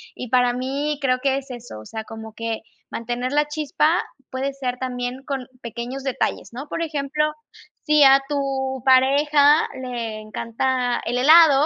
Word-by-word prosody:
Y 250 - -7
para 245 0 +3
mí, 275 +4 -2
creo 255 -2 +2
que 270 -1 +2
es 275 0 -7
eso, 240 - -8
o 110 - -12
sea, 220 - -6
como 220 0 -9
que 230 0 -4 0.3
mantener 240 +2 -3
la 295 +1 +3
chispa 305 +2 +1 0.3
puede 265 +2 -2
ser 255 -2 -3
también 250 0 -4
con 270 -3 -4
pequeños 240 +3 -6
detalles, 265 -2 -2
¿no? 270 +5 -7
Por - - -3
ejemplo, 300 -2 -1 0.6
si 300 -1 +5
a 270 0 +8
tu 270 -2 -2
pareja 285 +3 +5 0.2
le 235 -4 -4
encanta 245 +3 -1
el 245 +2 -1
helado, 300 0 +7
265 Hz, 160 wpm, -22 LUFS, 245-285 Hz, 0.6 s, a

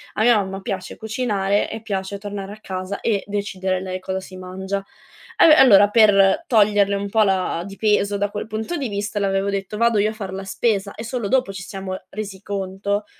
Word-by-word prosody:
A - - -1
mia 240 -1 +6
mamma 195 -1 -3
piace 190 -1 -5
cucinare 210 -3 0
e 225 0 -6
piace 200 -2 -4
tornare 200 -1 -6
a 215 - -10
casa 185 0 -5
e 210 -4 0
decidere 190 -2 -2
lei 185 0 -5
cosa 190 0 -3
si 190 0 -11
mangia. 190 +2 -5 0.5
Allo 315 - +8
e - - +8
allora 205 -8 +7
per 205 +2 +5
toglierle 205 - +3
un 200 0 -3
po' 220 +1 +3
la 185 -3 0
di 195 0 -10
peso 205 -1 +2
da 205 0 0
quel 210 +1 -5
punto 220 +9 -4
di 275 -7 -3
vista 205 +1 -3
le 200 - +1
avevo 195 +1 0
detto: 200 +1 -3
"Vado 235 -1 +3
io 210 +1 +3
a - - -5
far 200 -4 -6
la 195 0 -5
spesa," 200 0 -1
e 225 - -7
solo 235 -3 -3
dopo 250 -6 +1
ci 180 - -7
siamo 190 0 -6
resi 200 -2 -7
conto 200 +1 -3
200 Hz, 215 wpm, -21 LUFS, 195-215 Hz, 0.5 s, Allo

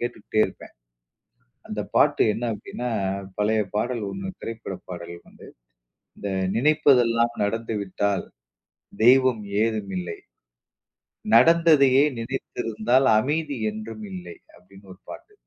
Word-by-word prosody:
கேட்டுட்டே 110 -2 -2
இருப்பேன். - - -13 1.0
அந்த - - -4
பாட்டு - - +4
என்ன 115 - -5
அப்டின்னா, 120 +4 -6 0.5
பழைய 110 +1 +2
பாடல் 120 +1 -1
ஒண்ணு 190 0 -5
திரைப்பட 110 -4 -6
பாடல் 85 -1 -7
வந்து, - - -15 0.7
இந்த 100 - -4 0.3
"நினைப்பதெல்லாம் 120 -4 +3
நடந்துவிட்டால் 100 -3 -2 0.8
தெய்வம் 130 -3 +5 0.2
ஏதும் 110 -4 -3
இல்லை. 90 -2 -6 1.2
நடந்ததையே 145 -1 +6 0.2
நினைத்திருந்தால் 120 0 -1
அமைதி 145 +2 -2
என்றும் 110 0 -8
இல்லை." 90 -2 -8 0.2
அப்டின்னு 95 +2 -17
ஒரு 95 - -21
பாட்டு. 420 - -12
115 Hz, 100 wpm, -24 LUFS, 100-130 Hz, 1.2 s, நடந்ததையே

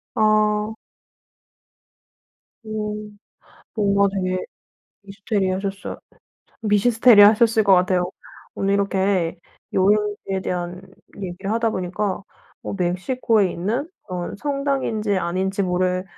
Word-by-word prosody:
아. 215 0 +2 1.9
오. 215 -1 -4 0.8
뭔가 200 -2 +3
되게 185 -1 -1 0.6
미스테리하셨어 195 -1 -3 0.6
미시스테리 220 +1 +5
하셨을 220 +2 +5
것 200 - +5
같아요. 180 0 +2 0.4
오늘 195 0 0
이렇게 190 -3 0 0.3
여행지에 205 0 +1
대한 180 +1 -4 0.4
얘기를 190 +1 -5
하다 230 0 +1
보니까 185 +2 -2 0.4
뭐 - - -5
멕시코에 190 +3 +1
있는 230 - -2 0.2
그런 180 -1 -5
성당인지 275 -7 -1
아닌지 190 +3 -1
모를 185 0 0
200 Hz, 230 characters per minute, -22 LUFS, 185-215 Hz, 1.9 s, 미시스테리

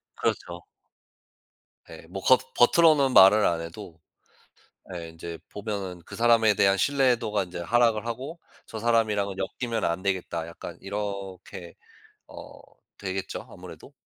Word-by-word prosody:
그렇죠. - - -3 1.3
예 - - -12
뭐 - - -6
겉 470 - +3
겉으로는 155 -6 +5
말을 100 +3 +7
안 85 -1 +1
해도 85 0 -10 1.0
예 85 -1 -6
인제 80 0 -8
보면은 100 -4 -5
그 - - -10
사람에 115 -2 +4
대한 95 +1 +3
신뢰도가 125 -6 +1
인제 90 0 -8
하락을 115 +3 +2
하고 130 +8 -6 0.3
'저 110 - -8
사람이랑은 105 -4 +1 0.3
엮이면 115 -2 -2
안 85 +2 -1
되겠다.' 90 -4 -2
약간 85 - -9
이렇게 95 -3 -6 0.5
어 - - -12 0.4
되겠죠, 95 -1 -5
아무래도. - - -12
100 Hz, 275 characters per minute, -26 LUFS, 90-115 Hz, 1.3 s, 말을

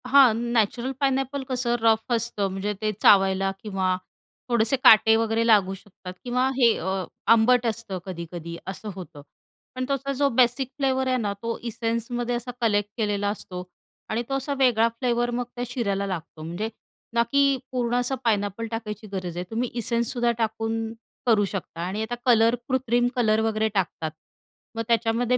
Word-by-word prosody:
हां, 265 -3 +7 0.2
natural 235 +3 +1
pineapple 270 0 0
कसं 245 -2 0
rough 225 +2 +2
असतं, 230 -3 0
म्हणजे 195 +2 -2
ते 215 0 +1
चावायला 195 -1 +5
किंवा 190 -3 0 0.5
थोडेसे 235 +1 +3
काटे 220 0 +8
वगैरे 225 0 +1
लागू 200 -4 +4
शकतात 190 -1 -11
किंवा 250 +1 +1
हे 235 -4 +5
अ, 190 +1 -2 0.3
आंबट 235 +2 +5
असतं 220 -4 -3
कधी-कधी 170 -2 -6
असं 195 +3 -6
होतं, 170 -6 -9 0.5
पण 255 0 -2
त्याचा 275 0 -1
जो 280 +1 +2
बेसिक 250 +1 +2
फ्लेवर 265 -2 +1
आहे 255 0 +2
ना, 210 -4 -1
तो 230 +3 -4
एसेन्समध्ये 235 +2 -2
असा 240 +1 -4
कलेक्ट 205 -3 +2
केलेला 205 -2 0
असतो 180 -3 -6 0.5
आणि 230 +2 -1
तो - - -2
असा 275 +2 -3
वेगळा 235 -4 +4
फ्लेवर 240 -1 +1
मग 245 +1 -1
त्या 245 - -3
शिऱ्याला 200 -5 -1
लागतो, 165 -4 -6
म्हणजे 175 +7 -3 0.4
ना, 235 0 +4
की 275 +1 +3
पूर्ण 245 -2 0
असं 245 +2 0
पायनॅपल 210 0 0
टाकायची 215 -2 -5
गरज 180 -3 -4
आहे, 175 - -2
तुम्ही 235 +2 -1
एसेन्स 235 0 0
सुद्धा 240 -1 +2
टाकून 225 0 -2 0.3
करू 220 -4 +4
शकता 185 -4 -6
आणि 200 +4 -3
आता 230 +2 -3
कलर 230 -1 +5
कृत्रिम 245 -2 +2
कलर 220 -3 +3
वगैरे 220 0 +1
टाकतात 170 -5 -1 0.6
मग 225 - -2
त्याच्यामध्ये 235 +1 +2
225 Hz, 165 wpm, -25 LUFS, 205-245 Hz, 0.6 s, काटे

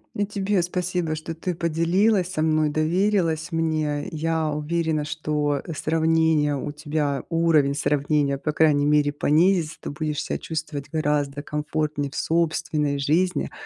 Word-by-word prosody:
И 205 - 0
тебе 200 -2 0
спасибо, 180 -2 -2
что 160 +1 -6
ты 180 +2 -3
поделилась 175 +4 +1
со 155 - -2
мной, 155 -1 +2
доверилась 165 +1 +1
мне. 155 -2 -1
Я 160 0 -1
уверена, 155 0 -1
что 150 -2 -1 0.2
сравнения 160 -2 +2
у 145 +2 -4
тебя, 145 -2 -2
уровень 165 -4 +3
сравнения, 145 -1 +1
по 150 - -1
крайней 150 -2 +3
мере, 150 -1 +3
понизится. 160 +2 +2
Ты - - -5
будешь 150 0 -3
ся - - -3
чувствовать 155 -3 -5
гораздо 145 -2 -1
комфортнее 150 -1 -2
в - - -12
собственной 155 -3 0
жизни. 170 +7 0
155 Hz, 135 wpm, -24 LUFS, 150-165 Hz, 0.2 s, уровень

